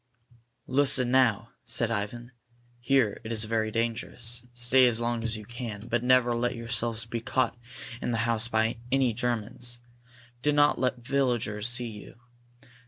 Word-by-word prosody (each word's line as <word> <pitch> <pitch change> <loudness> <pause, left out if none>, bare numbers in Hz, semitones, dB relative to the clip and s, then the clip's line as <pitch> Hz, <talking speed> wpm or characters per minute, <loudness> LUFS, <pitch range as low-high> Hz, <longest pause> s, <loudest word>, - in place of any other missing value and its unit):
"Listen, 130 -2 +3
now," 115 -3 +2
said 120 -1 -1
Ivan. 115 +3 -4 0.5
"Here 125 -4 +1
it 110 - -6
is 110 -1 +2
very 110 0 -1
dangerous. 115 +1 -1
Stay 120 +2 +4
as 115 -2 +2
long 120 0 -1
as 115 -1 +1
you 105 - -10
can, 115 -2 -7
but 120 0 -1
never 125 -1 +3
let 120 +1 -1
yourselves 115 -1 0
be 115 0 -5
caught 130 +2 0 0.5
in - - -3
the 115 - 0
house 115 -1 +2
by 110 0 0
any 130 -3 +2
Germans. 120 +1 -1 0.6
Do 150 +2 +1
not 145 0 +3
let 125 0 0
the 120 - -18
villagers 120 -5 0
see 120 0 +1
you. 105 +2 -12
120 Hz, 160 wpm, -27 LUFS, 115-125 Hz, 0.6 s, Stay